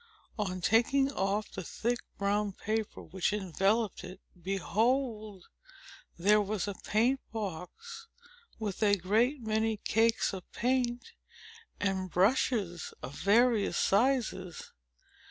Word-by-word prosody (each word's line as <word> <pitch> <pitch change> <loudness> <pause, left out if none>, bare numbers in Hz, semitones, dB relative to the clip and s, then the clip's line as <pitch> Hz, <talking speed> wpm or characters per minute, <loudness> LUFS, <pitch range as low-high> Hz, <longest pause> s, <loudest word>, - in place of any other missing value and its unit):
On 185 -3 -2
taking 270 +7 +3
off 200 -2 -1
the 190 - -6
thick 235 +7 -2 0.2
brown 205 0 0
paper 215 +2 -3
which 185 +3 -1
enveloped 205 +2 0
it, 185 +1 -9 0.2
behold! 215 +2 -1 0.7
there 210 +5 +4
was 205 -1 -2
a 200 - -2
paint 235 +7 +1
box, 230 - -6 0.5
with 210 -3 -4
a 205 -1 +4
great 230 - +1
many 220 0 0
cakes 225 +1 +1
of 185 -2 -8
paint, 245 - 0 0.7
and 190 -2 -1
brushes 195 -2 +1
of 135 - -6
various 220 - +3
sizes. 215 -5 0
210 Hz, 110 wpm, -31 LUFS, 195-235 Hz, 0.7 s, there